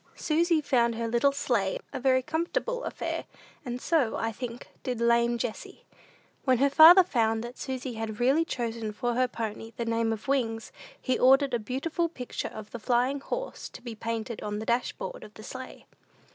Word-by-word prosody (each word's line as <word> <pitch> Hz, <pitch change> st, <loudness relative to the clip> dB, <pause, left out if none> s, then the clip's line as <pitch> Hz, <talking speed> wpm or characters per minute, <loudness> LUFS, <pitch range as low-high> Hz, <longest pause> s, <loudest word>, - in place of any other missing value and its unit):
Susy 330 Hz, 0 st, +2 dB
found 240 Hz, -5 st, +2 dB
her 230 Hz, 0 st, -2 dB
little 240 Hz, +5 st, +3 dB
sleigh 240 Hz, -9 st, 0 dB, 0.2 s
a -, -, -3 dB
very 260 Hz, 0 st, +3 dB
comfortable -, -, -2 dB
affair; -, -, -3 dB, 0.4 s
and 245 Hz, -2 st, -4 dB
so, 285 Hz, -6 st, +1 dB
I 225 Hz, -, -1 dB
think, 240 Hz, +1 st, -7 dB
did 250 Hz, -3 st, -3 dB
"lame 235 Hz, 0 st, +3 dB
Jessie." 230 Hz, -2 st, -6 dB, 0.6 s
When 260 Hz, -2 st, +3 dB
her 280 Hz, +3 st, +3 dB
father 335 Hz, +6 st, +10 dB
found 225 Hz, -8 st, +1 dB
that 240 Hz, +1 st, -7 dB
Susy 260 Hz, -1 st, -4 dB
had 220 Hz, -1 st, -5 dB
really 270 Hz, +7 st, +4 dB
chosen 230 Hz, -7 st, -3 dB
for 240 Hz, +2 st, -1 dB
her 255 Hz, +1 st, +2 dB
pony 225 Hz, -1 st, -5 dB
the 235 Hz, -, -2 dB
name 230 Hz, 0 st, +1 dB
of 220 Hz, +2 st, -5 dB
Wings, 230 Hz, -5 st, -1 dB, 0.3 s
he 255 Hz, -, 0 dB
ordered 270 Hz, +1 st, +5 dB
a 240 Hz, -, +2 dB
beautiful 295 Hz, -, -2 dB
picture 250 Hz, -6 st, -5 dB
of 215 Hz, -1 st, -9 dB
the 235 Hz, -, -6 dB
Flying 250 Hz, +4 st, +1 dB
Horse -, -, -5 dB
to -, -, -12 dB
be 240 Hz, -2 st, -6 dB
painted 225 Hz, 0 st, -4 dB
on 210 Hz, 0 st, -3 dB
the 220 Hz, -, -5 dB
dashboard 250 Hz, -, -2 dB
of 210 Hz, -, -13 dB
the 215 Hz, -, -11 dB
sleigh. 260 Hz, +3 st, -9 dB
245 Hz, 185 wpm, -28 LUFS, 225-275 Hz, 0.6 s, father